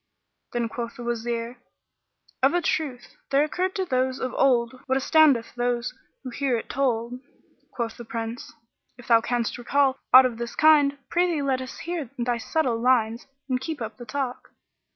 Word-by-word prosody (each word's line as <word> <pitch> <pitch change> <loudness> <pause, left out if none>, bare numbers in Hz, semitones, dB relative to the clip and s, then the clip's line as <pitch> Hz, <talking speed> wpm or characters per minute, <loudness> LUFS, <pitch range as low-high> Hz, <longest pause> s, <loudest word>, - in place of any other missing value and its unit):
Then 235 -1 -1
quoth 235 +1 -6
the 245 - -8
Wazir 235 0 -3 0.8
"Of 270 +6 +4
a 350 - +2
truth, 260 -6 -2
there 275 +1 +4
occurred 365 +5 -2
to 380 - -1
those 260 -3 0
of 255 - -3
old 255 -1 +2
what 260 0 +2
astoundeth 275 -4 +4
those 245 0 -1 0.3
who 255 - -6
hear 260 -1 0
it - - -7
told." 245 -2 -1 0.5
Quoth 230 -2 -4
the 240 - -8
Prince, 230 +1 -5 0.5
"If 245 - -14
thou 230 -1 +6
canst 240 +1 -2
recall 270 +2 +1
aught 260 +1 +10
of 235 -2 -2
this 235 0 -5
kind, 295 -2 +5
prithee 345 -4 +1
let 265 -2 0
us 260 0 -8
hear 330 -6 -4
thy 240 -1 -1
subtle 245 -3 0
lines 235 -2 +2 0.2
and 255 -2 -1
keep 310 +2 -4
up 225 -2 -6
the 240 - -9
talk." 260 +1 -4
255 Hz, 175 wpm, -25 LUFS, 235-275 Hz, 0.8 s, aught